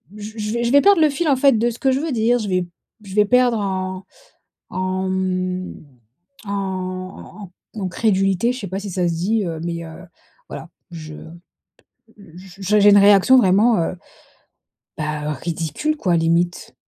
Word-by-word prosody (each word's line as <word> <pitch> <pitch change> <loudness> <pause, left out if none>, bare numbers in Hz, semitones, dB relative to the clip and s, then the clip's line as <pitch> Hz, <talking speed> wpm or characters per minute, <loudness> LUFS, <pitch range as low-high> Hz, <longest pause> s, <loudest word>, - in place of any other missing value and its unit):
j 210 +1 -8
je 215 +3 -2
je 235 - 0
vais 285 +1 +6
perdre 400 0 +5
le 310 -2 +4
fil 310 +3 -1
en 280 - +4
fait, 265 -3 +3
de 235 +2 +2
ce 235 - -7
que 265 - +1
je 260 - 0
veux 315 +1 -3
dire, 240 0 +2
je 210 -3 -4
vais 185 -1 0 0.4
je 190 - -9
vais 210 0 +4
perdre 245 0 +3
en 185 -1 -3 0.7
en, 185 0 -2
mmh, 185 -1 -2 0.7
en 190 0 -6 0.3
en 215 - -6
en 190 - -1
crédulité, 195 +2 +1
je 250 - -6
sais 200 - -6
pas 190 +2 -4
si 200 0 -7
ça 180 -1 0
se 170 - -1
dit, 200 +6 0
heu, 165 -2 -4
mais, 170 0 -4
heu, 160 +2 -11 0.5
voilà - - -8 0.2
je 155 -2 -9
p - - -11 1.1
j'ai 195 +3 -1
j'ai 205 - +6
une 205 - +7
réaction 200 +5 +6
vraiment, 220 0 +4
heu, 165 +2 -2 1.0
bah, 150 -1 -3
ridicule 165 - -3
quoi 180 - +1
limite. 170 +2 0
195 Hz, 180 wpm, -20 LUFS, 180-225 Hz, 1.1 s, une